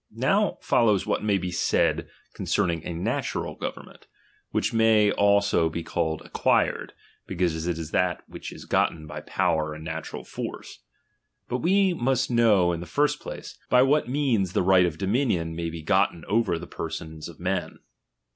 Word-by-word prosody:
Now - - +1
follows 105 -5 +3
what - - 0
may 105 -2 +2
be 90 -1 -3
said 90 - +1 0.2
concerning 85 -2 0
a - - -3
natural 85 +1 -2
government; - - -8 0.4
which - - -1
may 110 -2 +4
also 100 -5 +3
be 85 +1 -4
called 80 -1 -2
acquired, - - 0 0.3
because 85 -2 -1
it 85 -2 -1
is 80 -1 -6
that 90 -2 0
which - - -8
is - - -10
gotten 80 -2 0
by 75 - -7
power 75 -1 0
and 80 - -9
natural 80 0 -5
force. - - -7 0.7
But 125 - -2
we 190 +4 +3
must 130 -4 0
know 105 -7 +4
in 85 - -3
the 85 - -7
first 145 - +1
place, - - -9
by 125 0 +6
what 140 -1 +2
means 125 -10 +1
the - - +2
right 90 -1 +5
of 80 -2 -5
dominion 95 - 0
may 85 0 -3
be 80 -1 -7
gotten 95 -1 +1
over 105 -5 +1
the 85 - -7
per - - -5
sons 80 0 -7
of 85 - -13
men. 90 +1 -2
90 Hz, 170 wpm, -26 LUFS, 80-115 Hz, 0.7 s, by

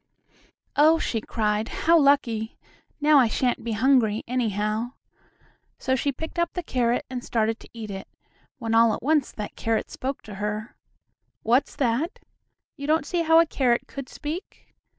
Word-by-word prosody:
"Oh!" 310 +3 +6
she 230 -8 -2
cried, 210 0 -1 0.2
"how 335 +1 +6
lucky! 275 -7 +2 0.4
Now 300 -1 +6
I 250 - +5
shan't 245 +2 0
be 230 - -2
hungry, 225 -2 +3
anyhow." 225 -1 -1 0.8
So 260 - 0
she 280 +2 0
picked 320 +5 -6
up 340 0 0
the 355 - -3
carrot 245 -4 0
and 255 -1 -5
started 225 0 0
to - - -15
eat 220 -3 -7
it, 195 0 -7 0.5
when 225 -2 -3
all 230 -1 +5
at - - -10
once 300 -1 +2
that 210 -1 -6
carrot 225 -1 -1
spoke 270 +1 -4
to 215 - -10
her. 210 +2 -3 0.7
What's 245 +5 +2
that? 270 - 0 0.6
You 280 -1 -6
don't 315 0 +2
see 345 +3 -1
how 325 0 +5
a 335 - +6
carrot 250 -6 +1
could 275 -2 -8
speak? 320 +5 -7
245 Hz, 165 wpm, -25 LUFS, 225-290 Hz, 0.8 s, Oh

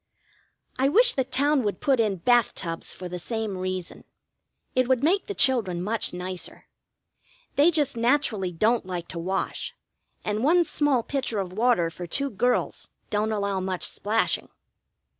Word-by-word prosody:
I 270 +1 +4
wish 480 +9 +5
the 265 - +1
town 285 +2 +1
would 205 -5 -2
put 270 -3 +2
in 215 -3 +2
bath 240 +5 +3
tubs 165 -2 -4
for 180 - -7
the 180 0 -5
same 220 +1 -3
reason. 185 -1 -4 0.7
It 255 -1 +2
would 260 0 +2
make 375 +6 +2
the 405 - -4
children 220 -10 +3
much 215 +4 -1
nicer. 180 0 -6 0.9
They 290 +4 +6
just 295 -5 +1
naturally 230 -6 +1
don't 215 +4 +1
like 175 -2 -4
to 170 - -5
wash, 190 +3 -3 0.5
and 210 +2 -1
one 345 +5 +5
small 290 -6 +1
pitcher 260 -5 -2
of 185 -2 -4
water 215 -6 +2
for 175 +2 -7
two 280 - -1
girls 245 +5 0 0.2
don't 215 +1 0
allow 200 -2 -1
much 185 -1 -3
splashing. 220 +2 0
220 Hz, 160 wpm, -26 LUFS, 185-265 Hz, 0.9 s, They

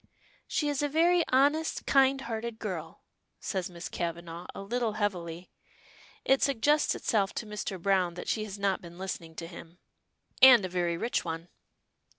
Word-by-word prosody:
"She 300 - 0
is 290 -1 0
a 290 - 0
very 340 +3 +4
honest, 290 +5 +2
kind 270 0 +4
hearted 230 -1 -4
girl," 175 -7 -6 0.4
says 190 -3 -3
Miss 175 0 -7
Kavanagh 170 0 -5
a - - -6
little 235 +1 -1
heavily. 180 -5 -3 0.7
It 270 0 +4
suggests 285 +3 +2
itself 200 -3 0
to - - -3
Mr. 210 -3 -5
Browne 185 -2 +1
that 175 - -7
she 215 - 0
has 205 -1 -7
not 195 -1 0
been 170 -1 -12
listening 175 -3 -6
to 165 - -6
him. 170 0 -11 0.6
"And 250 -6 +9
a - - -4
very 175 -1 -1
rich 235 +7 -1
one." 165 0 -5
200 Hz, 165 wpm, -29 LUFS, 175-255 Hz, 0.7 s, And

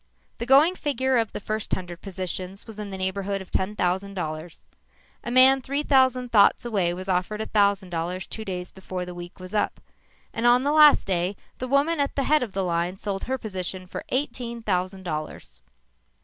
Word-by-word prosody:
The 235 - -3
going 285 +7 +6
figure 265 -6 0
of 225 -2 -1
the - - -5
first 215 +1 -2
hundred 175 -2 -8
positions 185 0 -5
was 220 -2 -10
in 210 -1 -5
the 190 - -5
neighborhood 195 +1 -2
of 190 - -11
ten 200 +3 -1
thousand 190 +1 -1
dollars. 160 -1 -6 0.6
A - - -4
man 260 +2 +7
three 280 +3 -2
thousand 260 -3 +3
thoughts 205 +1 +5
away 195 -7 +1
was 185 +2 -6
offered 185 +3 -1
a 220 - -2
thousand 200 -3 +1
dollars 175 +2 -3
two 220 - -6
days 180 -3 -5
before 185 -1 -6
the 180 - -7
week 175 +1 -10
was 185 +1 -9
up, 210 - 0 0.5
and 230 +1 +1
on 245 +1 +5
the 285 - +1
last 300 -1 +7
day, 185 +1 0 0.2
the 255 - -3
woman 285 +5 +2
at 280 -1 0
the 275 - 0
head 305 +3 +3
of 230 -6 -4
the 195 - -1
line 175 +1 -1
sold 195 -1 -3
her 265 +2 -1
position 185 -4 -5
for 180 - -7
eighteen 245 -4 -3
thousand 185 -1 -1
dollars. 155 - -6
200 Hz, 200 wpm, -25 LUFS, 185-250 Hz, 0.6 s, man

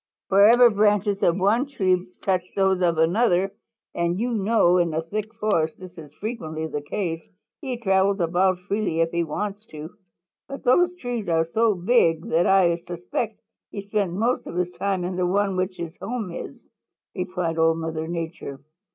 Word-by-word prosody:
"Wherever 225 +5 +7
branches 205 -1 +2
of 170 +1 +3
one 215 +8 +2
tree 185 -9 0 0.2
touch 185 -2 +1
those 190 -1 +2
of 170 -2 +2
another, 185 +3 +2 0.4
and 170 +2 -1
you 245 +2 -1
know 205 -4 +3
in 170 -3 +1
a 160 - -1
thick 215 +5 -4
forest 185 -8 0
this 185 -1 -11
is 155 -4 -11
frequently 160 -8 -5
the 150 -2 -4
case, 165 +2 -3 0.4
he 260 -5 -4
travels 195 -2 +2
about 180 +2 +2
freely 200 -6 0
if 165 0 +1
he 170 0 0
wants 200 +6 -4
to. 155 +2 -9 0.6
But 275 - -8
those 355 +8 +3
trees 245 - -4
are 165 -1 +2
so 220 +5 +1
big 175 -4 +2
that 170 +2 +3
I 180 -3 +4
suspect 180 +6 -4 0.3
he 200 - -6
spends 200 -4 -1
most 235 +4 0
of - - -7
his 180 0 -1
time 190 0 -2
in 180 +1 -3
the 180 -1 +1
one 200 +2 +1
in - - -4
which 185 0 -2
his 170 -1 -6
home 230 -6 -4
is," - - -7 0.6
replied 180 -3 -3
Old 165 0 +3
Mother 160 -1 -4
Nature. 165 -5 -5
185 Hz, 175 wpm, -24 LUFS, 170-210 Hz, 0.6 s, Wherever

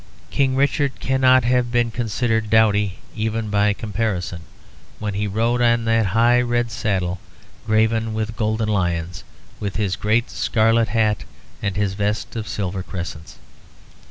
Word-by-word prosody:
King 135 -2 +1
Richard 140 0 +1
cannot 130 -1 +4
have 120 0 +1
been 120 -1 +1
considered 115 -1 -1
dowdy, 105 -3 +3 0.2
even 110 -1 -2
by 105 0 +3
comparison, 100 -5 -3 0.6
when 105 -1 -3
he 105 +1 -1
rode 115 +4 0
on 115 -1 +3
that 115 -2 +2
high 120 +5 +4
red 120 -1 0
saddle 95 -5 -1 0.5
graven 110 0 +1
with 110 0 -3
golden 110 0 0
lions, 90 -3 -1 0.4
with 100 -1 -4
his 100 -4 0
great 110 +6 0
scarlet 115 0 +2
hat 105 -1 +1 0.4
and 100 -2 -2
his 100 -1 0
vest 105 +2 -2
of 110 -2 -4
silver 95 -1 -3
crescents. 85 -4 -7
110 Hz, 140 wpm, -21 LUFS, 100-115 Hz, 0.6 s, cannot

